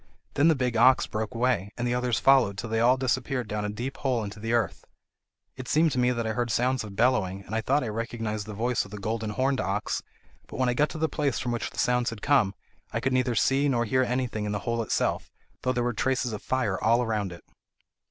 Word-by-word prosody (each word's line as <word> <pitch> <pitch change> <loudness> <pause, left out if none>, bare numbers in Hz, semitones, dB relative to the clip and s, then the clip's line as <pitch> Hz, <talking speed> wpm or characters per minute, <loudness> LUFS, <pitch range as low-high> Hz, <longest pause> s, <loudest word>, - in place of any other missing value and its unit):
Then 145 +3 +4
the 165 - +5
big 125 -3 -1
ox 130 +3 +5
broke 110 +2 -4
away, 115 -4 0
and 120 0 -1
the 120 - 0
others 125 -1 0
followed 130 -8 +4
till 110 +2 -5
they 110 - +1
all 125 +3 +4
disappeared 130 -1 -1
down 105 0 -3
a - - -2
deep 120 +6 -5
hole 125 -5 0
into 105 +1 -7
the 115 +2 -3
earth. 115 -8 0 0.7
It 130 -1 -8
seemed 160 +1 +3
to 125 - -1
me 125 0 +3
that 120 -2 -1
I 110 - 0
heard 120 +2 -1
sounds 125 +2 +1
of 105 -2 -9
bellowing, 100 -5 +1
and - - -9
I 110 - +1
thought 145 - +1
I - - -3
recognised 110 -1 -3
the 105 - -6
voice 120 +3 0
of 100 - -12
the 105 - -7
golden 110 +2 -3
horned 130 +5 0
ox; 100 +2 -2 0.5
but - - -8
when 130 -1 +2
I - - +2
got 150 +5 +2
to - - -7
the 160 +1 +1
place 145 -4 -1
from 120 - -2
which 120 - -2
the - - -16
sounds 125 -1 +2
had 115 -2 -9
come, 125 -9 +3 0.4
I - - -1
could 135 0 -1
neither 125 -2 +1
see 135 +5 +2
nor 120 -3 +1
hear 130 +4 +2
anything 125 -4 -1
in 105 - -2
the 105 - -1
hole 115 -1 0
itself, 110 - -1 0.3
though 130 - +1
there 125 -1 0
were 120 0 0
traces 125 0 0
of 105 - -5
a - - -25
fire 125 -7 -1
all 115 +2 +3
round 105 -4 -1
it." 85 -1 -11
120 Hz, 255 wpm, -27 LUFS, 110-130 Hz, 0.7 s, the